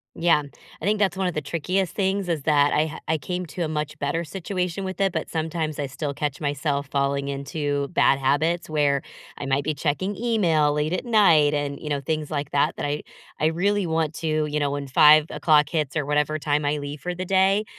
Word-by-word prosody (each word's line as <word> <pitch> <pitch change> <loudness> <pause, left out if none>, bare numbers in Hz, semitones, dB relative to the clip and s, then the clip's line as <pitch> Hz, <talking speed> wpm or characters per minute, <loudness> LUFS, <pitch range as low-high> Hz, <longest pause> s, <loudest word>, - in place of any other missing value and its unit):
Yeah. 165 -3 +3 0.4
I 160 - -6
think 210 +1 +1
that's 190 -3 +1
one 190 - 0
of 180 - -2
the 155 - -2
trickiest 175 +6 -2
things 195 -2 0
is 155 -4 -1
that 145 -2 +3
I 155 +1 +2
ha 155 - -7
I 160 - +1
came 180 +5 -4
to 165 +4 -4
a 160 - -1
much 150 -1 -3
better 145 +4 -1
situation 180 +2 -3
with 190 0 -4
it, 195 - +3
but - - -3
sometimes 160 -2 -3
I 140 - -1
still 140 +2 -4
catch 145 0 -3
myself 145 -1 -1
falling 140 0 0
into 140 0 -2
bad 140 -5 +3
habits 160 +6 +1
where 145 -3 +1 0.4
I - - -4
might 135 +1 +1
be 155 - -1
checking 160 +8 -2
email 180 -10 +2
late 150 +3 -1
at 185 - -1
night 170 -11 +4
and, 145 -1 -3
you 150 - -6
know, 145 -1 0
things 155 +2 -3
like 145 -2 -3
that 140 - +1
that - - -3
I 145 +1 -2 0.4
I 155 - +3
really 190 +3 +1
want 160 -1 0
to, 155 -1 0
you 150 0 -2
know, 145 - +1
when 140 0 -4
5:00 150 +1 +5
hits 155 -4 -2
or 150 - -1
whatever 150 +1 +1
time 150 0 0
I 145 +1 0
leave 145 0 -6
for 180 0 -4
the 185 +1 -4
day, 195 +3 +3
155 Hz, 225 wpm, -24 LUFS, 145-175 Hz, 0.4 s, 5:00